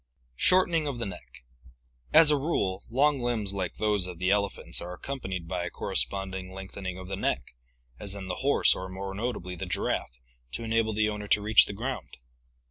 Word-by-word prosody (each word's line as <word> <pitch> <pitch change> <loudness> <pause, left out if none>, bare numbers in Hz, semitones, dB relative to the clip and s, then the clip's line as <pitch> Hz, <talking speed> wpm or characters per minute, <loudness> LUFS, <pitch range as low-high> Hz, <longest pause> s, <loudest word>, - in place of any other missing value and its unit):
Shortening 175 -4 +4
of 140 -4 -3
the 115 - -2
Neck. 90 -9 -9 0.3
— - - -45 0.3
As 155 -1 +8
a - - +5
rule, 100 - -1
long 140 +3 +3
limbs 115 -5 -1
like 95 -3 -3
those 105 -4 +1
of 90 -2 -7
the 95 +2 +1
elephants 100 -1 0
are 90 +1 -6
accompanbd 95 -11 -5
by 90 0 -2
a 90 - -3
corresponding 95 +1 -1
lengthening 95 -1 -6
of 95 -1 -8
the 95 - -3
neck, 65 -9 -2 0.5
as 100 -1 -1
in 95 -2 -6
the 90 - -3
horse 140 +2 +4
or 95 0 -6
more 95 +1 -5
notably 100 -4 -3
the 85 - -5
giraffe, 60 - -2 0.3
to - - -4
enable 115 -1 +1
the 105 0 +2
owner 105 -1 -4
to 105 - +4
reach 110 0 +6
the - - -5
ground. 125 +6 -5
100 Hz, 195 wpm, -28 LUFS, 95-120 Hz, 0.5 s, As